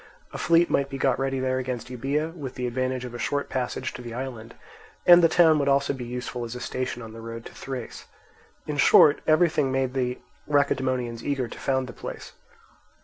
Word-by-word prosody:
A - - -4
fleet 170 0 +4
might 140 0 0
be 135 - -5
got 135 -1 +1
ready 135 0 -1
there 130 0 0
against 125 -1 -4
Euboea, 145 +6 -2
with 135 -6 -7
the 125 - -3
advantage 130 +1 -2
of 120 - -8
a 120 - -6
short 145 +3 -1
passage 125 -2 -3
to - - -8
the 120 -1 -7
island; 120 -3 -6 0.5
and 175 0 +9
the 165 - +5
town 160 -2 +5
would 140 - 0
also 140 0 +2
be 130 -3 -6
useful 125 0 -5
as 120 +1 -6
a - - -5
station 125 0 -4
on 110 -1 -9
the 115 - -9
road 115 0 -8
to - - -10
Thrace. 130 -3 -7 0.6
In 150 -1 -4
short, 145 +1 +6
everything 155 -3 +3
made 130 -1 0
the 125 -2 -1 0.3
Lacedaemonians 130 -5 0
eager 135 -4 -1
to - - -10
found 130 -1 0
the 125 - -9
place. - - -8
130 Hz, 205 wpm, -25 LUFS, 125-140 Hz, 0.6 s, and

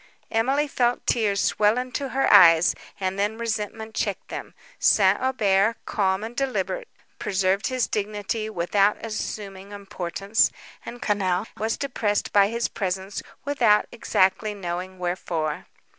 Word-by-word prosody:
Emily 270 +7 +1
felt 245 -3 0
tears 205 -4 +1
swell 210 +4 +2
into 255 +2 -3
her 270 +1 +1
eyes, 170 -4 +7 0.3
and 190 0 -2
then 210 +2 0
resentment 220 -1 -4
checked 200 -2 -3
them. - - -7 0.2
St. 195 -1 +4
Aubert, 220 -4 +2
calm 190 -1 0
and 230 +2 -6
deliberate, 275 - -2 0.3
preserved 195 +1 +1
his 255 -2 0
dignity 210 +1 -3
without 200 +2 +2
assuming 200 -3 -6
importance, 200 0 0 0.3
and 240 - -8
Quesnel 195 -2 0
was 220 +2 -2
depressed 220 -7 -1
by 200 -1 +6
his 235 +2 -1
presence 190 0 -3 0.2
without 240 -7 +3
exactly 210 -2 +1
knowing 185 0 -5
wherefore. 175 -4 -3
205 Hz, 130 wpm, -24 LUFS, 190-230 Hz, 0.3 s, eyes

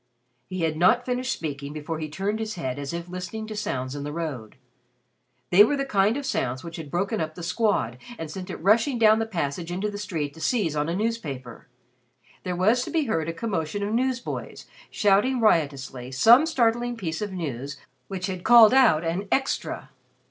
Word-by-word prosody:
He 185 -1 -4
had 160 -1 0
not 225 +9 +4
finished 250 +1 -1
speaking 145 -2 -4
before 155 +1 -5
he 155 -1 -4
turned 200 +7 -2
his 220 -1 -4
head 130 -5 -4
as 140 -1 -4
if 170 0 -5
listening 185 +5 -6
to 215 0 -7
sounds 130 -10 -3
in 145 - -5
the 145 - -4
road. 150 -9 -5 1.0
They 190 +4 +9
were 285 +7 +1
the 275 - -1
kind 210 -1 +2
of 285 - -4
sounds 130 - -2
which 170 0 -7
had 160 -3 -7
broken 195 +6 -1
up 155 0 -4
The 175 - -8
Squad, 170 - 0 0.2
and 160 -2 -6
sent 185 +1 -7
it - - -4
rushing 225 - +2
down 220 -1 +5
the 225 - -1
passage 170 -3 -3
into 195 +4 -2
the 205 - -6
street 160 -9 -3
to 160 - -12
seize 170 - 0
on 150 +1 0
a 170 - -1
newspaper. 155 - -4 0.7
There 180 -1 -3
was 215 +8 +3
to - - -6
be 325 -2 +1
heard 165 - -1
a - - 0
commotion 190 -1 -3
of 205 +2 -2
newsboys 250 0 -2 0.2
shouting 210 +5 +2
riotously 140 - 0
some 235 - +6
startling 240 -4 +1
piece 165 -5 -4
of 210 -1 -3
news 140 -6 -5 0.3
which 190 -2 -4
had 185 -2 -5
called 230 -2 +8
out 235 -12 +5
an 180 +5 -2
"Extra." 270 0 -1
185 Hz, 200 wpm, -25 LUFS, 155-225 Hz, 1.0 s, They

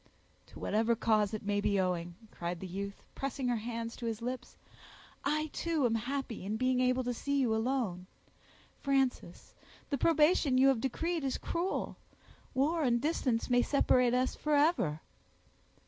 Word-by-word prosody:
"To - - -14
whatever 225 +2 +1
cause 215 -2 +2
it 215 - -6
may 205 0 +1
be 200 -1 +1
owing," 175 -2 -1 0.2
cried 175 0 -4
the 190 - -6
youth, 200 +2 -6
pressing 270 -1 -3
her 240 - +2
hands 230 +1 -4
to 235 - -4
his 225 -1 -2
lips, 250 +1 -5 0.7
"I, 305 +1 0
too, 325 -5 0
am 230 - +2
happy 245 -1 -3
in 210 +3 -2
being 255 +1 +1
able 255 0 +2
to 245 0 -1
see 280 +4 -1
you 245 -4 +2
alone. 220 -7 -1 0.7
Frances, 270 -2 -1 0.4
the 280 - 0
probation 305 -3 +4
you 265 +1 +6
have 255 -4 +2
decreed 325 +5 -1
is 265 -1 -1
cruel; 345 +3 -2 0.6
war 310 +5 +2
and 240 -4 +2
distance 255 -5 0
may 245 -1 +4
separate 250 -3 +3
us 255 +1 +1
forever." 290 - +1
250 Hz, 160 wpm, -32 LUFS, 220-275 Hz, 0.7 s, you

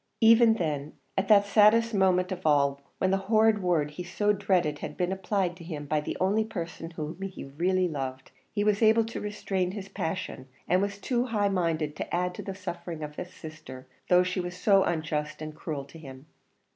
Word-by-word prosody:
Even 225 0 +7
then, 150 -6 -3 0.2
at 195 0 0
that 205 -1 +6
saddest 220 +3 +5
moment 185 -2 +2
of 185 0 -5
all, 140 -2 +2 0.2
when 190 - +1
the 195 - +3
horrid 220 -1 +4
word 165 -5 +1
he 180 +4 -6
so 205 +4 +1
dreaded, 185 -7 +1
had - - -6
been 180 0 0
applied 190 -2 -1
to 175 - -12
him 155 -4 -6
by 150 +1 0
the - - -4
only 200 +4 +2
person 170 -6 -6
whom 160 +1 -6
he 195 -1 -6
really 180 +7 0
loved, 130 -4 -5 0.2
he 205 - 0
was 210 0 +2
able 220 0 +5
to 230 - -6
restrain 190 -3 -2
his 200 -2 -7
passion, 175 -7 -4 0.2
and 180 +1 +3
was 200 0 -2
too 240 +3 0
high 210 -4 +1
minded 165 -5 -1
to - - -5
add 180 +1 0
to - - -7
the 195 - -6
suffering 175 -4 -6
of 150 0 -7
his 180 - -6
sister, 155 -6 -10 0.2
though 180 0 +6
she 180 +1 -2
was 175 0 -4
so 195 +1 +4
unjust 155 -2 -2
and 155 0 -6
cruel 150 -4 -5
to 160 +4 -13
him. 135 -2 -11
180 Hz, 205 wpm, -28 LUFS, 155-200 Hz, 0.2 s, Even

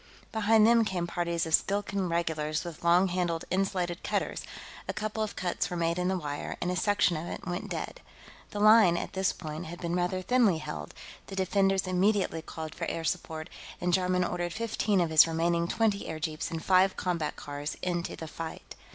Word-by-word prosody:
Behind 220 0 +4
them 230 0 +6
came 185 -5 -1
parties 170 -1 -1
of 160 - -4
Skilkan 200 0 +1
regulars 160 -2 -1
with 170 -3 -8
long 175 +3 +5
handled 175 -2 -1
insulated 185 -2 0
cutters; - - -2 0.5
a - - -2
couple 215 0 -3
of 215 -1 -2
cuts 180 -1 -1
were 175 - -3
made 170 +1 0
in 180 - 0
the 190 0 +1
wire, 145 -4 -4
and 175 - -1
a - - -1
section 185 -2 +2
of 160 +2 -4
it - - -6
went 180 0 -4
dead. - - -5 0.5
The 205 - -5
line, 215 -4 +7
at - - -4
this 190 -1 +1
point, 155 0 -6
had 175 +2 -8
been 170 0 -2
rather 180 +1 0
thinly 230 -6 +3
held; 75 - -6 0.3
the 195 - -7
defenders 195 0 +2
immediately 185 -2 +1
called 160 -1 -7
for 170 - -4
air 165 - -3
support, 160 -1 -3 0.3
and 175 0 0
Jarman 180 0 +2
ordered 175 -1 -2
fifteen 215 -3 +1
of 165 -2 0
his 160 +1 +8
remaining 170 +1 +1
twenty 210 0 +1
airjeeps 155 -1 -3
and 165 -1 -5
five 190 0 +4
combat 170 -4 -1
cars 145 0 -5
into 175 -1 -2
the 160 - -7
fight. 165 +1 -7
175 Hz, 195 wpm, -29 LUFS, 165-195 Hz, 0.5 s, his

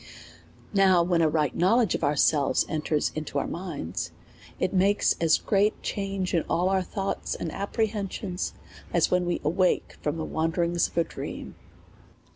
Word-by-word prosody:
Now 190 -3 +5
when 170 -1 +2
a 160 - +4
ri^ht 150 -3 +1
knowledge 220 +4 +3
of - - -3
ourselves 145 0 +3
enters 155 -1 0
into 155 -2 -4
our 140 - 0
mind.«t, 160 - -4 0.5
it 185 - 0
makes 195 +2 +3
as 165 -1 +5
great 205 +1 +2
a - - -26
change 195 -2 -2
in 170 - +3
all 175 +2 +2
our 190 -1 +2
thoughts 195 +2 -3
and 165 - -4
apprehensions, 200 -2 -3 0.4
as 170 -2 +2
when 180 -1 +2
wc 175 - -1
awake 180 +5 +1
from 150 +2 -1
the 160 - -3
wanderings 170 +1 0
of - - -17
a 170 - +5
dream. - - -7
175 Hz, 160 wpm, -27 LUFS, 160-195 Hz, 0.5 s, Now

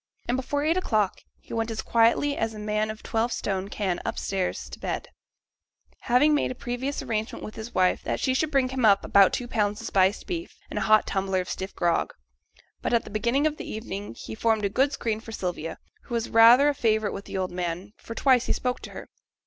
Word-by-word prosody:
And 245 - +1
before 275 +3 -1
eight 325 +3 +2
o'clock, 215 - 0 0.2
he - - -11
went 225 0 -1
as 225 -1 -4
quietly 235 +5 +3
as 225 -3 -2
a - - -8
man 215 +1 -1
of 215 +1 -7
twelve 230 +1 0
stone 195 -3 -2
can 190 -4 -2
upstairs 190 -2 -2
to - - -9
bed, - - -4 0.9
having 265 +5 +3
made 295 - +1
a 255 - -5
previous 255 +4 -3
arrangement 220 -3 -3
with 215 - -8
his 220 +2 -8
wife 185 -1 +3
that - - -2
she 260 - +1
should 310 +4 +1
bring 270 -3 +2
him 260 -1 -2
up 200 -3 +5
about 195 -1 +6
two 245 - -3
pounds 210 -3 0
of 230 - -8
spiced 190 -1 +2
beef, 345 -1 -5
and - - -2
a - - -2
hot 215 0 +6
tumbler 195 -1 0
of 180 - -8
stiff 190 +1 -5
grog. 170 -1 0 0.7
But - - +1
at 230 - +2
the - - -11
beginning 235 +7 +1
of 305 -1 0
the - - -7
evening 205 - -6
he 110 - -8
formed 220 - +1
a - - +1
good 270 +7 +2
screen 220 -5 -2
for 225 - -10
Sylvia, 175 -5 -4 0.3
who 240 - -4
was 230 -1 -2
rather 235 +5 +8
a 290 - +3
favourite 220 -5 +1
with 200 - -7
the - - -5
old 185 -1 -2
man, 180 +3 -4
for 230 - -9
twice 255 -2 +3
he - - +2
spoke 250 0 -2
to - - -10
her. - - -8
225 Hz, 230 wpm, -26 LUFS, 200-250 Hz, 0.9 s, rather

